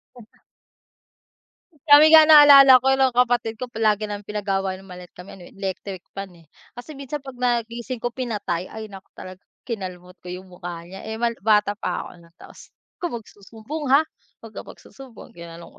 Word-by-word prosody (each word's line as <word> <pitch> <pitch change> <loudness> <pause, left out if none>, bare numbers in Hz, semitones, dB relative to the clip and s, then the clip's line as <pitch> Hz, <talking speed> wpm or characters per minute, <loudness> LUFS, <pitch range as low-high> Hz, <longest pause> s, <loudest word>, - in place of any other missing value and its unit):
M 240 -3 -14 1.6
Kami 295 +2 +7
nga 315 -1 +8
naalala 280 -4 +8
ko 265 0 +2
nung 260 -2 +2
kapatid 240 -2 +1
ko 250 +2 -8
palagi 215 -2 0
naming 205 0 -8
pinag-aawayan 195 -2 -3
'yung 195 - -15
maliit 180 0 -13
kami 180 +2 -13
ano 175 - -13
eh, - - -19
electric 195 -1 -6
fan 195 0 -7
eh. 165 - -20 0.3
Kasi 245 +6 -10
minsan 280 +1 -7
pag 265 -3 -11
na 240 -2 0
gising 235 +1 -8
ko 240 - -2
pinatay, 210 -8 -4
ay 220 -1 -10
naku 195 0 -13
talaga 185 0 -11 0.2
kinalmot 180 -5 -8
ko - - -15
'yung 180 +1 -9
mukha 175 -1 -8
niya 190 +4 -11
eh, 220 - -5
mal 235 +1 -1
bata 210 0 +1
pa - - -3
ako - - -11
nun 170 0 -22
tapos, - - -17
"Wag - - -83
kang - - -10
magsusumbong 225 +7 -9
ha, 275 +3 +5 0.4
wag 225 - -11
ka - - -8
magsusumbong," 265 -4 -14
ginanun 170 0 -12
220 Hz, 185 wpm, -22 LUFS, 190-250 Hz, 1.6 s, nga